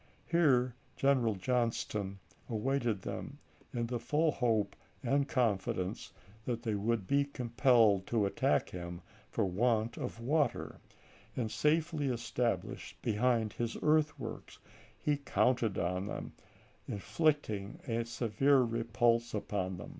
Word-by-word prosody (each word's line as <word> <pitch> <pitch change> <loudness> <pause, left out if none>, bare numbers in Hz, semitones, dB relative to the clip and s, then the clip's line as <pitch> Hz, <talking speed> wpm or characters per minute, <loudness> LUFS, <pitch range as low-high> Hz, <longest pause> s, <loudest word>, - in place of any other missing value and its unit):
Here 130 -8 +3 0.2
General 130 -6 +2
Johnston 105 -3 -1 0.3
awaited 115 -2 0
them - - -5 0.3
in 120 -1 -1
the 120 0 -3
full 150 +7 +2
hope 115 -6 +1 0.3
and 140 0 +2
confidence 95 -7 -1 0.3
that 120 -2 -2
they 110 - 0
would 105 0 0
be 140 +6 +3
compelled 120 -6 +3
to 110 -3 +2
attack 100 - +1
him 85 0 -6 0.3
for 110 - 0
want 110 +4 +1
of - - -5
water, 140 +2 0 0.6
and 115 -4 -2
safely 155 -1 +1
established 120 -1 -2
behind 115 -1 +1
his 120 -1 -3
earthworks, 150 -6 0 0.4
he 150 -1 +1
counted 125 -5 +1
upon 90 +4 -2 0.6
inflicting 110 - 0
a 115 -1 0
severe 125 +4 +2
repulse 115 0 +1
upon 95 -3 -2
them. - - -8
115 Hz, 115 wpm, -33 LUFS, 105-135 Hz, 0.6 s, Here